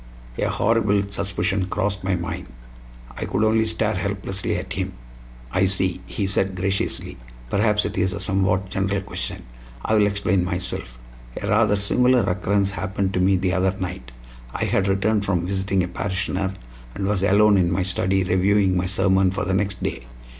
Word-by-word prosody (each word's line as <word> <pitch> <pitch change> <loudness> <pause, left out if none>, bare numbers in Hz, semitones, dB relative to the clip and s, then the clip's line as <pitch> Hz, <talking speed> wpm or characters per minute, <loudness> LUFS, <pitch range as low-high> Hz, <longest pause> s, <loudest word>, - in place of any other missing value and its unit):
A - - +1
horrible 105 -3 +2
suspicion 95 0 -1
crossed 100 +1 -2
my 95 -1 +1
mind; 85 -1 -4 0.7
I - - -3
could - - 0
only 110 0 +3
stare 110 -1 0
helplessly 100 0 -2
at - - -4
him. - - -3 0.6
"I 95 +1 +3
see," 95 -1 -1
he 100 - -2
said 95 0 0
graciously; 95 +1 -2 0.3
"perhaps 105 0 +2
it - - -3
is 95 +1 +2
a 100 - -4
somewhat 95 -1 0
general 95 +1 0
question. 100 - -5 0.4
I - - +1
will 105 -1 +5
explain 100 -2 +1
myself. 90 -9 -3 0.4
A - - -4
rather 105 - +3
singular 125 +5 +3
occurrence 100 +1 +1
happened 95 0 -2
to 90 - 0
me 95 +1 +4
the 90 0 0
other 95 0 +1
night. 90 -10 -5 0.4
I - - -1
had 100 - +1
returned 100 +2 +1
from 90 -4 0
visiting 95 0 0
a - - -2
parishioner, 95 +1 -2 0.4
and 100 - -2
was 100 -1 0
alone 100 +1 +5
in 85 -1 +2
my 95 +1 +1
study 95 +1 +1
reviewing 95 +1 +2
my 90 0 0
sermon 95 0 +3
for 95 - -2
the 95 - -1
next 100 -1 -1
day. - - -3
95 Hz, 175 wpm, -23 LUFS, 95-100 Hz, 0.7 s, will